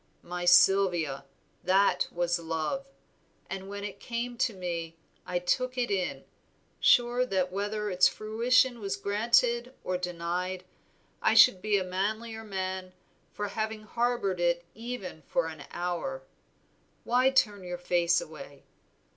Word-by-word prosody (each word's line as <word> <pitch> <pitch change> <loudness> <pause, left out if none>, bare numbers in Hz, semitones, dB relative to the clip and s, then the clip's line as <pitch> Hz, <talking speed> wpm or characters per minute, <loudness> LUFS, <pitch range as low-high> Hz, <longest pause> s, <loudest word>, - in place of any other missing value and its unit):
My 175 0 -5
Sylvia, 175 -5 +4 0.4
that 195 +2 +3
was 175 0 0
love, 165 - -3 0.6
and 195 0 -5
when 200 0 -6
it 200 -1 -6
came 240 +2 -4
to 255 - +2
me 170 -3 -4 0.3
I 180 -1 -1
took 255 +9 -1
it 240 -3 0
in, 185 -3 -1 0.6
sure 245 +1 +4
that 190 -7 0
whether 205 +2 -2
its 185 0 +5
fruition 235 +3 +2
was 200 -2 -2
granted 235 +5 +1
or 180 0 -2
denied 180 +1 -3 0.6
I - - +3
should 190 -8 +7
be 210 0 +2
a 190 - 0
manlier 220 +5 -3
man 190 -2 -4 0.4
for 205 0 -4
having 215 +1 -3
harbored 235 -4 -1
it 175 0 +1
even 225 -7 -7
for 175 - +1
an 155 -3 -7
hour. 180 - -3 0.8
Why 250 +2 +3
turn 210 -7 +2
your 180 0 -5
face 175 -1 +2
away? 140 -3 -10
195 Hz, 135 wpm, -29 LUFS, 175-230 Hz, 0.8 s, should